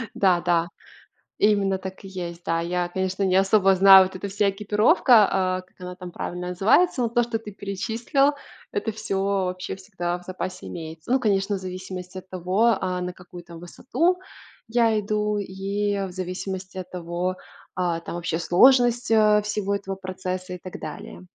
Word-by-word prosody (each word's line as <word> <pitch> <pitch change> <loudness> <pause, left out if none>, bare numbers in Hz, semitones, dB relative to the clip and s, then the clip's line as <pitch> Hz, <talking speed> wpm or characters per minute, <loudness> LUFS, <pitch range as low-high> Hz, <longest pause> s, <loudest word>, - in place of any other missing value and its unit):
Да-да! 175 -3 +2 0.7
Именно 200 -2 +3
так 190 +1 -8
и - - -8
есть. 175 -2 -7
Да, 165 0 0
я, 175 +1 -1
конечно, 190 +1 -2
не 185 -1 +2
особо 195 0 +4
знаю, 190 0 +9
вот 185 - -8
эта 195 +2 -5
вся 200 +1 +1
экипировка, 210 - +4
а, 185 -1 0
как 185 - -29
она 180 0 -7
там 180 -1 -9
правильно 180 +1 -5
называется, 225 - +3
но 235 - +1
то, 240 +1 +2
что 230 -1 -3
ты 210 -2 -9
перечислил, 225 +9 0 0.4
это 410 - -2
всё 205 -3 -3
вообще 190 -2 -2
всегда 185 -3 -4
в - - -17
запасе 185 0 -6
имеется. 160 +4 -7
Ну, 265 - +4
конечно, 205 -3 +1
в - - -4
зависимости 185 0 -7
от 185 - -18
того, 190 +5 +2
а, 185 -1 -2
на 180 0 -4
какую 175 -1 -12
там 170 -1 -11
высоту 325 - -1 0.5
я 225 -2 +2
иду, 210 0 -1
и 200 +1 -2
в - - -9
зависимости 185 +1 -5
от 185 - -6
того, 175 +1 -3 0.4
а, 175 -2 0
там 170 - -7
вообще 165 -1 -2
сложность, 245 +6 +4
э, 215 -1 +5
всего 205 -1 -1
этого 195 -1 -4
процесса 185 -1 -5
и 180 - -7
так 185 +1 -9
далее. - - -8
190 Hz, 175 wpm, -24 LUFS, 180-210 Hz, 0.7 s, знаю